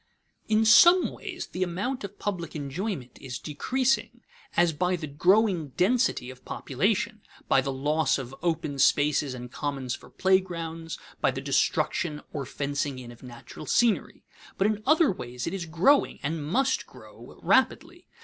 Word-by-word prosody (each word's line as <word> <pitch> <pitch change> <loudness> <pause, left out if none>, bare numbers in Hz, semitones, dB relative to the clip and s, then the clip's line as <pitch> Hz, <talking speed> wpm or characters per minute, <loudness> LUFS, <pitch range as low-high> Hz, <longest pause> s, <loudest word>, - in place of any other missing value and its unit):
In 220 0 +3
some 345 +11 +7
ways - - -7
the 185 - -5
amount 195 +9 -2
of 200 0 -7
public 175 -6 -4
enjoyment 145 - -5
is 125 -3 -5
decreasing, 240 - -1 0.4
as 175 -1 +4
by 180 +4 0
the 165 -3 -5
growing 175 - +2
density 215 - +1
of 130 - -15
population, 210 - -1 0.3
by 135 - +4
the 135 +1 -3
loss 145 +1 +1
of 130 -2 -7
open 160 -4 -2
spaces 145 -1 +3
and 125 -1 -8
commons 135 -3 -3
for - - -9
playgrounds, 170 -4 -1 0.2
by - - +3
the - - -3
destruction 150 -3 0
or 140 -4 -4
fencing 140 -1 -3
in 125 -2 -9
of 120 - -15
natural 125 +4 -11
scenery; 235 -3 +1 0.3
but 195 - +2
in 210 0 +1
other 310 0 +5
ways 125 -9 -6
it 165 - -3
is 180 -4 -4
growing 185 - +3
and 155 +1 -2
must 260 - 0
grow - - -14
rapidly. - - +1
165 Hz, 155 wpm, -27 LUFS, 140-205 Hz, 0.4 s, some